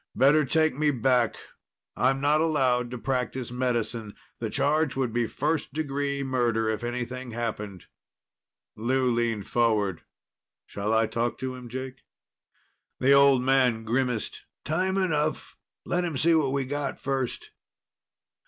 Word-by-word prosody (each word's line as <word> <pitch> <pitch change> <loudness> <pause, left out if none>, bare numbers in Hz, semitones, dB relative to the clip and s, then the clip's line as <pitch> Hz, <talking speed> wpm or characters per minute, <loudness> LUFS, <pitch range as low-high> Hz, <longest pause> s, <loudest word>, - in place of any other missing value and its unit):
"Better 145 +3 +5
take 155 +2 +2
me 150 +3 +1
back. 125 -3 +2 0.6
I'm 135 +2 +2
not 150 +2 +3
allowed 130 -6 +2
to 125 - -5
practice 125 -1 -2
medicine. 120 -4 -2 0.2
The - - -3
charge 155 0 +1
would 130 -4 -1
be 120 -1 +1
first 150 +1 -2
degree 140 -2 -2
murder 120 -4 0
if 110 +1 -2
anything 125 +1 -4
happened." 105 -5 -4 0.9
Lou 125 +2 +1
leaned 115 -4 -1
forward. 105 -7 +1 0.6
"Shall 100 +2 -3
I 110 0 +3
talk 115 +2 -2
to 130 -1 -4
him, 125 -1 -9
Jake?" 130 +1 -6 1.0
The 135 - +3
old 140 -2 +6
man 130 -4 +3
grimaced. 120 0 -2 0.2
"Time 185 +5 0
enough. 155 -5 -1 0.3
Let 180 +1 0
him 165 -5 -2
see 165 +4 +3
what 150 -5 +2
we 135 -1 -1
got 140 0 -3
first." 135 -2 -3
130 Hz, 135 wpm, -27 LUFS, 120-140 Hz, 1.0 s, old